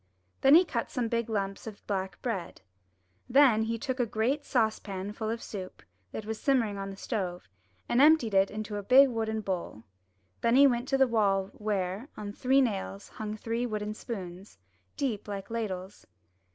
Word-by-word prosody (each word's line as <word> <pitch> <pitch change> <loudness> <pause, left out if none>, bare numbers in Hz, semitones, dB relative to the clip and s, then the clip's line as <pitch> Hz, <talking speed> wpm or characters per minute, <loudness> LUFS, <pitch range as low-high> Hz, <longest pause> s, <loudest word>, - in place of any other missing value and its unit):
Then 270 +2 +7
he 355 +3 +7
cut 235 -8 -3
some 245 -2 -1
big 235 0 -1
lumps 195 -1 -3
of 210 -2 -9
black 190 -2 -3
bread. 215 -9 -4 0.7
Then 255 -4 +6
he 225 +1 -1
took 260 +1 -3
a 245 - +3
great 240 +7 0
saucepan 205 -5 -1
full 220 0 -4
of 230 +1 -3
soup, 190 -3 -8 0.3
that 215 - -6
was 220 0 -5
simmering 230 -8 +1
on 195 0 -4
the 195 - -7
stove, 185 -6 -4 0.4
and 240 - +3
emptied 295 -8 +5
it 195 0 +4
into 210 0 -5
a - - -3
big 260 +6 +6
wooden 220 -2 -2
bowl. 180 - -4 0.6
Then 235 +1 +3
he 280 +2 +8
went 245 -1 +2
to 270 - +2
the 265 - +6
wall 200 -4 +1
where, 205 +3 -3
on 205 -1 -6
three 265 +5 +3
nails, 200 -4 -2
hung 215 0 -6
three 230 +3 -2
wooden 210 -1 -3
spoons, 190 - -8 0.4
deep 235 -8 -2
like 200 +1 -6
ladles. 200 -4 -5
220 Hz, 180 wpm, -29 LUFS, 195-240 Hz, 0.7 s, he